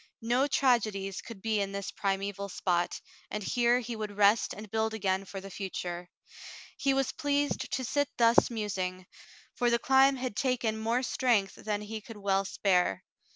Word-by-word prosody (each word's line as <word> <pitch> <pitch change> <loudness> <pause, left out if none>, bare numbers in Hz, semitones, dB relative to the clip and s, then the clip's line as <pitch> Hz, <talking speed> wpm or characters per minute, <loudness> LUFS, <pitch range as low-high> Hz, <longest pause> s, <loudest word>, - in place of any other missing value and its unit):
No 245 +4 +2
tragedies 215 -8 +1
could 215 -5 -11
be 220 -2 +1
in 195 0 -3
this 200 -1 -4
primeval 200 0 -2
spot, 175 -2 0 0.3
and 210 0 -4
here 240 +4 +3
he 235 0 -5
would 210 -2 -5
rest 205 +2 +4
and 210 +1 -8
build 220 0 0
again 195 -2 0
for 195 0 -7
the 195 +1 -9
future. 180 -2 -5 0.7
He 275 - +1
was 270 0 +1
pleased 285 0 -1
to 260 - -1
sit 285 +3 0
thus 230 0 +5
musing, 190 -5 -3 0.5
for 245 - +1
the 235 - +3
climb 265 +3 +5
had 255 -4 -4
taken 235 -3 0
more 230 +3 0
strength 230 -7 +1
than 210 -1 -3
he 215 +1 -6
could 225 0 -11
well 195 -1 +1
spare. 180 - +1
215 Hz, 170 wpm, -30 LUFS, 195-240 Hz, 0.7 s, thus